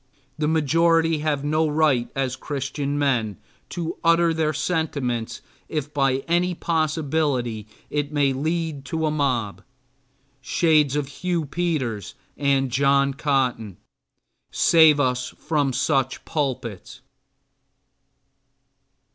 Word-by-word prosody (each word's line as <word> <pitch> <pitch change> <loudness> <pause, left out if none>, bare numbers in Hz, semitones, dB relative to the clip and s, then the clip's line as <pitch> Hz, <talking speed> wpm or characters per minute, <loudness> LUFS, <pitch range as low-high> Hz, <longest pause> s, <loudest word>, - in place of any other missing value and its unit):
The 150 -1 -1
majority 165 +1 +3
then 150 +1 -4
have 145 -2 0
no 155 +2 +1
right 150 -5 +2
as 130 -2 -1
Christian 140 +1 -3
men, 120 -9 0 0.3
to 170 0 -4
utter 170 0 +4
their 160 -1 0
sentiments 145 -7 -2 0.3
if 150 -2 -4
by 135 -1 +1
any 175 +1 +1
possibility 150 - -1 0.2
it 145 0 -1
may 145 -2 +2
lead 155 +1 -2
to 160 +3 -2
a 155 - +1
mob. 130 -9 -1 0.8
Shades 150 0 +2
of 145 -2 -1
Hugh 170 +3 -2
Peters 140 - -2 0.2
and 135 -2 +1
John 140 +1 +3
Cotton, 130 - -1 0.7
save 160 -3 +5
us 125 -2 -1
from 145 -4 0
such 130 +1 0
pulpits! 130 - -4
145 Hz, 110 wpm, -23 LUFS, 130-160 Hz, 0.8 s, save